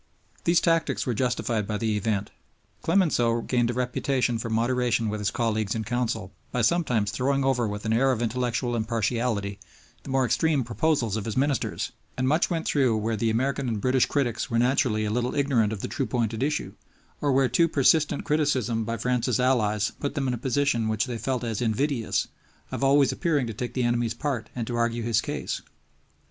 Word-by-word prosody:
These 170 Hz, 0 st, +4 dB
tactics 165 Hz, -1 st, +1 dB
were 125 Hz, -, 0 dB
justified 115 Hz, -2 st, -1 dB
by 105 Hz, -, -1 dB
the 110 Hz, 0 st, 0 dB
event. 105 Hz, -1 st, -1 dB, 0.5 s
Clemenceau 145 Hz, -10 st, +2 dB
gained 120 Hz, 0 st, +1 dB
a 120 Hz, -, -2 dB
reputation 125 Hz, -1 st, 0 dB
for 115 Hz, -, -4 dB
moderation 120 Hz, 0 st, +1 dB
with 105 Hz, 0 st, -3 dB
his 100 Hz, -, +1 dB
colleagues 110 Hz, -2 st, -1 dB
in 110 Hz, -, -2 dB
Council 115 Hz, -3 st, -2 dB, 0.2 s
by 125 Hz, -, 0 dB
sometimes 120 Hz, -7 st, +2 dB
throwing 135 Hz, +4 st, 0 dB
over 125 Hz, -4 st, +2 dB
with 105 Hz, 0 st, -5 dB
an 110 Hz, -, +1 dB
air 135 Hz, +4 st, +3 dB
of 125 Hz, -, -1 dB
intellectual 120 Hz, +1 st, -1 dB
impartiality 110 Hz, -2 st, -1 dB, 0.4 s
the -, -, -11 dB
more 135 Hz, -1 st, +2 dB
extreme 145 Hz, +3 st, +2 dB
proposals 115 Hz, -1 st, 0 dB
of 105 Hz, -, -4 dB
his 110 Hz, -, -3 dB
ministers; 140 Hz, -1 st, 0 dB, 0.3 s
and 130 Hz, 0 st, 0 dB
much 155 Hz, +5 st, +2 dB
went 165 Hz, -3 st, -2 dB
through 130 Hz, -6 st, +2 dB
where 110 Hz, +1 st, -1 dB
the 115 Hz, +2 st, 0 dB
American 130 Hz, +4 st, 0 dB
and 110 Hz, -2 st, -2 dB
British 130 Hz, +3 st, +2 dB
critics 125 Hz, -5 st, -1 dB
were 115 Hz, -, 0 dB
naturally 120 Hz, -3 st, +2 dB
a 105 Hz, -, -1 dB
little 125 Hz, +2 st, -1 dB
ignorant 130 Hz, -7 st, +2 dB
of 105 Hz, -3 st, -4 dB
the -, -, -3 dB
true 135 Hz, -3 st, -2 dB
point 115 Hz, -3 st, -1 dB
at 110 Hz, -, -4 dB
issue, 150 Hz, +2 st, -1 dB, 0.5 s
or 145 Hz, -, +2 dB
where 135 Hz, 0 st, +4 dB
too 165 Hz, +8 st, +3 dB
persistent 145 Hz, 0 st, +2 dB
criticism 130 Hz, -7 st, +1 dB
by 115 Hz, +1 st, -3 dB
France's 125 Hz, -1 st, 0 dB
allies 110 Hz, -5 st, +2 dB
put 140 Hz, 0 st, -3 dB
them 135 Hz, -2 st, -1 dB
in 125 Hz, -, 0 dB
a -, -, -2 dB
position 130 Hz, -3 st, +1 dB
which 110 Hz, +2 st, 0 dB
they 120 Hz, -3 st, -5 dB
felt 130 Hz, -1 st, -2 dB
as 115 Hz, -2 st, -2 dB
invidious, 120 Hz, +1 st, 0 dB, 0.4 s
of -, -, -3 dB
always 140 Hz, 0 st, +4 dB
appearing 150 Hz, -6 st, 0 dB
to 115 Hz, -, -5 dB
take 120 Hz, +3 st, -5 dB
the 125 Hz, -, +1 dB
enemy's 120 Hz, -1 st, 0 dB
part 130 Hz, -7 st, -3 dB
and 120 Hz, -2 st, -2 dB
to 120 Hz, -, -4 dB
argue 115 Hz, 0 st, 0 dB
his 115 Hz, -2 st, +2 dB
case. -, -, -4 dB
120 Hz, 200 wpm, -26 LUFS, 110-135 Hz, 0.5 s, These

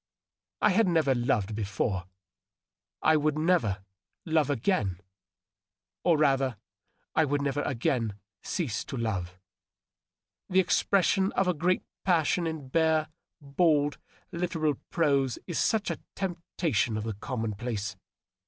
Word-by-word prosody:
I 210 Hz, -, +6 dB
had 210 Hz, +2 st, +3 dB
never 160 Hz, -6 st, +3 dB
loved 120 Hz, -4 st, 0 dB
before; 100 Hz, -2 st, -2 dB, 1.0 s
I 155 Hz, -, +5 dB
would 155 Hz, 0 st, +1 dB
never 125 Hz, -, +1 dB, 0.4 s
love 160 Hz, -4 st, +2 dB
again 110 Hz, -, 0 dB, 0.5 s
— 95 Hz, 0 st, -65 dB
or, 170 Hz, -3 st, +4 dB
rather, 135 Hz, -5 st, +2 dB, 0.6 s
I 160 Hz, -, +4 dB
would 145 Hz, -1 st, +1 dB
never 140 Hz, +1 st, 0 dB
again 115 Hz, -5 st, -1 dB, 0.3 s
cease 145 Hz, -, -2 dB
to 135 Hz, -, -5 dB
love. 95 Hz, -6 st, -2 dB, 1.1 s
The 185 Hz, -, +4 dB
expression 190 Hz, +1 st, +3 dB
of 195 Hz, -, +1 dB
a 180 Hz, -, +3 dB
great 180 Hz, +3 st, +1 dB, 0.2 s
passion 170 Hz, -1 st, +2 dB
in 155 Hz, -5 st, -5 dB
bare, 160 Hz, +1 st, +2 dB, 0.3 s
bald, 145 Hz, 0 st, +2 dB, 0.3 s
literal 170 Hz, -3 st, 0 dB, 0.2 s
prose 140 Hz, -6 st, +2 dB
is 170 Hz, -, -2 dB
such 220 Hz, -2 st, +1 dB
a -, -, -4 dB, 0.2 s
temp 180 Hz, -3 st, -3 dB, 0.2 s
tation 115 Hz, -, +1 dB
of 110 Hz, -, -3 dB
the 110 Hz, 0 st, -3 dB
commonplace. 110 Hz, -2 st, -3 dB
145 Hz, 125 wpm, -28 LUFS, 110-165 Hz, 1.1 s, I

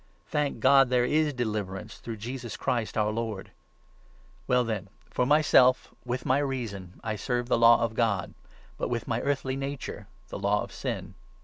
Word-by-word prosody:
Thank 145 Hz, -6 st, -1 dB
God, 135 Hz, +1 st, +6 dB
25 -, -, -10 dB
there 125 Hz, -1 st, +3 dB
is 150 Hz, +3 st, +2 dB
deliverance 105 Hz, -5 st, -4 dB
through 115 Hz, -2 st, -6 dB
Jesus 120 Hz, +2 st, -6 dB
Christ, 115 Hz, -3 st, -1 dB
our 105 Hz, 0 st, +2 dB
Lord! 110 Hz, -3 st, -4 dB, 1.0 s
Well 125 Hz, 0 st, +3 dB
then, 105 Hz, -4 st, -3 dB, 0.2 s
for 125 Hz, -, +1 dB
myself, 135 Hz, -4 st, +4 dB
with 125 Hz, +1 st, -3 dB
my 130 Hz, +2 st, +3 dB
reason 115 Hz, -10 st, -4 dB
I 110 Hz, -1 st, -2 dB
serve 120 Hz, +3 st, -2 dB
the 120 Hz, -, +2 dB
Law 115 Hz, 0 st, +7 dB
of 115 Hz, -1 st, -1 dB
God, 110 Hz, -5 st, 0 dB, 0.5 s
but -, -, -1 dB
with 120 Hz, -1 st, -2 dB
my 115 Hz, +1 st, -1 dB
earthly 135 Hz, -2 st, -1 dB
nature 135 Hz, 0 st, -5 dB, 0.2 s
the -, -, -6 dB
Law -, -, +1 dB
of -, -, -9 dB
Sin. -, -, -4 dB
120 Hz, 175 wpm, -28 LUFS, 110-130 Hz, 1.0 s, Law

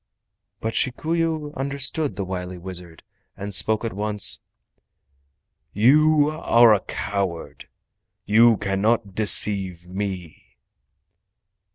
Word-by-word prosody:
But 110 Hz, 0 st, -3 dB
Shikuyu 155 Hz, +3 st, -1 dB
understood 140 Hz, -1 st, -3 dB
the 100 Hz, 0 st, -4 dB
wily 90 Hz, -1 st, -5 dB
wizard, 90 Hz, -2 st, -8 dB, 0.3 s
and 100 Hz, +1 st, -6 dB
he -, -, -7 dB
spoke 110 Hz, +4 st, +1 dB
at 115 Hz, -, -3 dB
once: 105 Hz, +1 st, +1 dB, 1.3 s
"You 150 Hz, +7 st, +4 dB
are 120 Hz, -7 st, +4 dB
a 105 Hz, -, +2 dB
coward! 95 Hz, -3 st, -4 dB, 0.6 s
You 115 Hz, +2 st, +5 dB
cannot 105 Hz, +1 st, 0 dB
deceive 95 Hz, -4 st, +1 dB
me!" 95 Hz, -3 st, -7 dB
105 Hz, 95 wpm, -23 LUFS, 95-130 Hz, 1.3 s, You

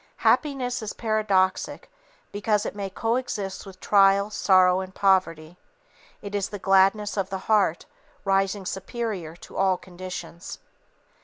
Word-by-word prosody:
Happiness 255 Hz, -5 st, +1 dB
is 215 Hz, -, -5 dB
paradoxic 210 Hz, -4 st, 0 dB, 0.4 s
because 210 Hz, 0 st, 0 dB
it -, -, -4 dB
may 200 Hz, -1 st, -4 dB
coexist 215 Hz, -3 st, -3 dB
with 185 Hz, -1 st, -12 dB
trial, 200 Hz, 0 st, +4 dB
sorrow 185 Hz, -3 st, +4 dB
and 190 Hz, 0 st, -7 dB
poverty. 180 Hz, -4 st, +1 dB, 0.6 s
It 200 Hz, 0 st, -7 dB
is 200 Hz, -1 st, -1 dB
the 205 Hz, -, -6 dB
gladness 195 Hz, +2 st, +2 dB
of 195 Hz, -1 st, -1 dB
the 190 Hz, -, -3 dB
heart, 205 Hz, -6 st, +2 dB, 0.4 s
rising 195 Hz, 0 st, +1 dB
superior 190 Hz, -5 st, -4 dB
to -, -, -12 dB
all 190 Hz, -1 st, +2 dB
conditions. 180 Hz, -1 st, -8 dB
195 Hz, 130 wpm, -25 LUFS, 185-210 Hz, 0.6 s, trial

